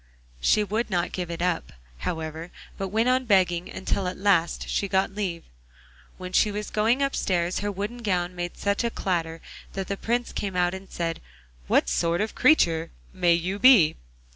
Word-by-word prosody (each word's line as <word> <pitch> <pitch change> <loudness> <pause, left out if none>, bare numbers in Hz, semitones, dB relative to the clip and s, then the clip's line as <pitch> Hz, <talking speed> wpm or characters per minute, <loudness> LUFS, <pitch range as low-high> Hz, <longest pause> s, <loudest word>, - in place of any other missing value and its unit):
She 210 - +3
would 215 +4 -2
not 180 -2 0
give 180 -2 -4
it 170 0 -3
up, 180 -2 -1 0.3
however, 160 - -4 0.3
but 195 - -3
went 220 +5 +1
on 255 0 +2
begging 180 -5 +2
until 190 0 -2
at 180 - -4
last 185 -4 +1
she 200 - -1
got 190 0 +1
leave. 190 -5 -3 0.7
When 185 0 -8
she 210 - +4
was 210 +1 -5
going 230 +6 +2
upstairs 185 -10 0
her 205 0 -2
wooden 205 +5 -5
gown 180 -5 -1
made 175 0 -5
such 200 +3 0
a 235 - +1
clatter 165 -6 -2 0.3
that 195 -1 -4
the 200 - -2
Prince 240 +3 -1
came 195 -2 -3
out 180 0 +2
and 190 0 -8
said, 165 -1 -3 0.5
'What - - +3
sort 170 0 +1
of 215 +1 -1
a - - -24
creature 165 - +3 0.2
may 180 -2 +3
you 185 +4 -2
be? 230 -12 +7
190 Hz, 185 wpm, -25 LUFS, 175-210 Hz, 0.7 s, be